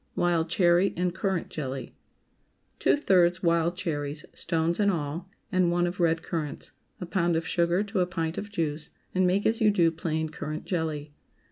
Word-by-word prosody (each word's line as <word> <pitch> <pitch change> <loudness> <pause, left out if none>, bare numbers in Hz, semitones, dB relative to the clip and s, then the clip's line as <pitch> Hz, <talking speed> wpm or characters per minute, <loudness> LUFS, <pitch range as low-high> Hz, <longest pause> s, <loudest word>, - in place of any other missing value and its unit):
WILD 170 -2 +1
CHERRY 175 +2 +3
AND 180 0 0
CURRANT 190 -1 -1
JELLY. 135 -3 -5 0.8
✠ - - -39
Two - - +3
thirds 180 - +3
wild 170 0 +2
cherries 150 -4 -3
(stones 165 +1 0
and 205 -1 +4
all) 165 +1 -3 0.2
and 185 -2 +3
one 175 0 +2
of 175 +1 -4
red 165 -1 +2
currants. 155 -4 -4 0.3
A 180 - -4
pound 170 -1 +1
of 165 0 -1
sugar 170 +3 +2
to 205 -1 -2
a 180 - +2
pint 165 -2 -2
of 205 - -7
juice, 160 -5 -2 0.2
and 185 0 +3
make 190 +3 +1
as 225 +1 +2
you 215 - +6
do 175 -5 +3
plain 160 -1 -2
currant 155 +1 -5
jelly. 155 -4 -3
170 Hz, 180 wpm, -27 LUFS, 160-185 Hz, 0.8 s, you